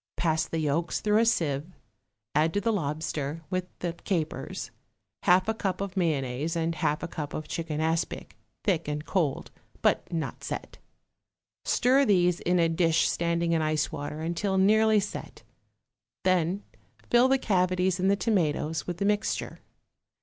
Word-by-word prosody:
Pass 160 -2 +1
the 165 - -3
yolks 160 +2 0
through 210 0 +3
a 230 - +3
sieve, 150 -9 +1 0.7
add 160 +3 +2
to - - +3
the 225 +2 +1
lobster, 155 -2 -3
with 185 -1 0 0.2
the 175 -1 -1
capers, 170 -2 -3 0.5
half 180 +2 +4
a 220 - +2
cup 195 -4 -2
of 195 -2 -4
mayonnaise 150 -3 0
and 165 0 0
half 155 -1 -1
a - - -2
cup 150 -3 -5
of 155 - -5
chicken 160 -2 -3
aspic, 160 +1 -1 0.3
thick 175 -7 +1
and 150 +1 -3
cold, 165 -8 -1 0.3
but - - +2
not 165 -2 -3
set; - - -6 0.9
stir 260 +3 +4
these 180 -6 +3
in 180 +1 +1
a 170 -1 +4
dish 165 0 +2
standing 170 0 0
in 165 -1 +2
ice 155 -1 0
water 145 +2 -5
until 175 +4 -1
nearly 215 +2 +5
set; 205 - -6 0.8
then 185 +1 +1 0.5
fill 240 +2 +6
the 270 +1 +4
cavities 185 -4 +1
in 185 - +2
the 200 - +4
tomatoes 165 -6 0
with 175 -1 -3
the 200 - -1
mixture. 210 +1 -1
170 Hz, 155 wpm, -28 LUFS, 155-195 Hz, 0.9 s, fill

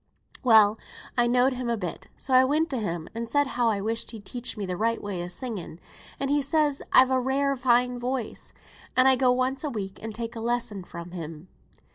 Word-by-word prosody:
Well, 220 -3 +6 0.4
I 240 -1 +3
know'd 250 +2 +3
him 250 -1 -3
a 235 - 0
bit, 180 -5 -5
so 260 - -4
I 255 0 +8
went 300 +5 +1
to 265 - -1
him, 170 -6 -3
and 230 0 -4
said 285 0 +3
how 245 -3 +1
I 205 -2 0
wished 225 +2 -2
he'd 215 -4 -9
teach 245 +2 -5
me 205 - -3
the 180 -1 -3
right 230 +4 0
way 190 -4 -4
o' - - -5
singing; 185 -4 -5 0.4
and 275 +1 -1
he 290 0 +3
says 290 0 +1
I've 260 0 +6
a 260 - +3
rare 275 +2 +1
fine 250 -1 +2
voice, 245 -2 -3 0.5
and 255 +1 +6
I 265 - +6
go 255 0 +3
once 255 +2 0
a 300 - -1
week, 195 -6 -5
and 225 - -5
take 230 0 -5
a - - -4
lesson 235 -4 -1
fra' 170 -1 -9
him. 165 -1 -8
240 Hz, 220 wpm, -26 LUFS, 205-260 Hz, 0.5 s, I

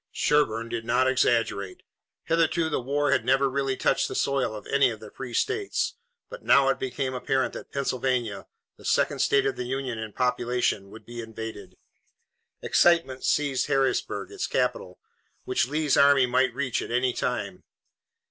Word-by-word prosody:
Sherburne 115 -6 +1
did 115 -1 -4
not 125 +3 +2
exaggerate. 115 -6 0 0.4
Hitherto 165 0 +1
the 150 - -1
war 145 +3 0
had 140 - +2
never 135 +1 +3
really 135 0 -1
touched 135 - +1
the - - -6
soil 135 -5 0
of 105 - -9
any 140 -2 +3
of 110 -2 -6
the 110 -1 -11
free 125 -3 -7
states, 415 -1 -1 0.3
but - - -10
now 140 -1 +4
it - - 0
became 130 0 -3
apparent 130 +1 -1
that - - -9
Pennsylvania, 125 -6 -2 0.3
the - - -17
second - - +1
state 140 - +3
of 135 - -1
the 125 - -3
Union 130 -2 -3
in 110 -1 -6
population, 125 -4 0
would 110 - -13
be 120 0 -7
invaded. 110 -4 -8 0.9
Excitement 165 -7 +3
seized 140 -3 +1
Harrisburg, 135 - 0
its 400 -2 -3
capital, - - -1 0.5
which 380 0 0
Lee's 150 -2 +1
army 140 -2 +5
might 125 0 +1
reach 130 -3 -1
at - - -6
any 125 +1 +1
time. - - -3
130 Hz, 165 wpm, -26 LUFS, 120-140 Hz, 0.9 s, army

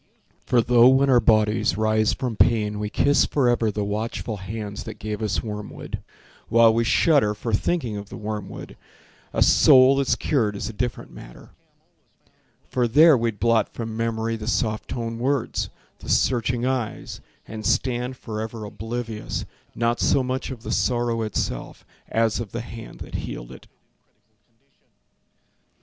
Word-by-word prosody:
For 120 - +4
though 120 0 +6
when 135 +1 +4
our 125 - +6
bodies 110 -5 +2
rise 110 0 +2
from 125 -4 -3
pain 105 -2 +2
We 105 0 -3
kiss 145 +6 +3
forever 120 -5 +2
the 105 0 -2
watchful 110 +1 -3
hands 105 +1 -6
That - - -8
gave 105 0 -5
us 100 -4 -1
wormwood, 105 -1 -6 0.5
while 115 0 +6
we 115 +1 +2
shudder 115 -3 +3
For 115 +2 -4
thinking 120 -2 0
of 100 0 -8
the - - -8
wormwood, 105 -2 -6 0.5
A - - +3
soul 130 +1 +6
that's 140 -1 +2
cured 115 -9 0
is 100 - -4
a 115 - -6
different 120 +2 -4
matter, - - -13 1.2
For 125 -2 0
there 150 +6 +7
we'd 115 -3 -1
blot 115 -2 +1
from 115 -1 -5
memory 115 0 -1
The 110 -1 -7
soft 110 -2 -1
toned 115 -1 -4
words, 135 0 -1 0.3
the - - -10
searching 120 0 +1
eyes, 130 -4 -3 0.3
And 110 0 -7
stand 125 +2 0
forever 110 -1 -6
oblivious, 110 +1 -5 0.3
Not 120 0 0
so 135 - +2
much 130 +1 -3
of 125 -4 -8
the - - -5
sorrow 120 -2 0
itself 110 -2 -4 0.2
As 115 -1 +1
of 115 -4 -6
the 120 - -3
hand 115 -1 -10
that - - -9
healed - - -6
it. - - -13
115 Hz, 150 wpm, -23 LUFS, 105-120 Hz, 1.2 s, there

